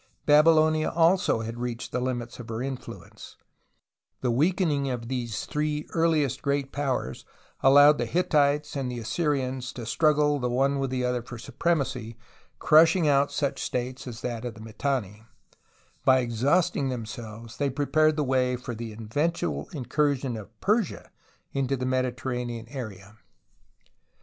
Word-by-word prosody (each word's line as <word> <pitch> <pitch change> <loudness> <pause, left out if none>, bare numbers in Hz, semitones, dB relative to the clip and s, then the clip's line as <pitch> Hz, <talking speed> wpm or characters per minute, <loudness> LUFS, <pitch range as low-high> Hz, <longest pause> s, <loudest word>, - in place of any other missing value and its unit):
Babylonia 155 +1 +5
also 170 - +3
had 115 +1 -6
reached 120 -1 -4
the 125 - -1
limits 120 -2 -3
of 120 -1 -9
her 115 +2 -3
influence: 135 -1 -8
and - - -38 0.8
the 125 - +2
weakening 150 0 +1
of 120 -2 -4
these 120 -4 -3
three 150 0 -2
earliest 160 -5 +1
great 140 -1 -1
powers 135 - -2 0.4
allowed 145 +2 +7
the - - -1
Hittites 150 -4 +1
and 135 -3 -2
the 125 - -5
Assyrians 130 0 -1
to 120 - -7
struggle 150 +3 +2
the 125 -1 -1
one 135 +3 +1
with 135 -1 -1
the 125 -1 -1
other 125 -1 0
for 120 +1 -9
supremacy, 125 -4 -2 0.4
crushing 160 +2 +5
out 140 0 +3
such 140 -2 -1
states 125 +1 -3
as 120 -2 -7
that 120 -2 -4
of 120 -2 -5
the 110 - -11
Mitanni, 110 -2 -2
and 110 - -22 0.8
by 130 0 +5
exhaust 130 +9 +1
ing 135 -2 0
themselves, 115 -1 -7
so 140 +4 -1
prepared 155 +3 +2
the 150 - 0
way 130 -1 +1
for 125 0 -6
the 115 0 -6
eventual 145 +11 -2
incursion 140 - 0
of 110 0 -10
Persia 210 -2 0 0.4
into 135 0 0
the 125 - -3
JNIediter 130 -1 0
ranean 120 -2 -3
area. 110 -5 -8
130 Hz, 155 wpm, -26 LUFS, 120-150 Hz, 0.8 s, allowed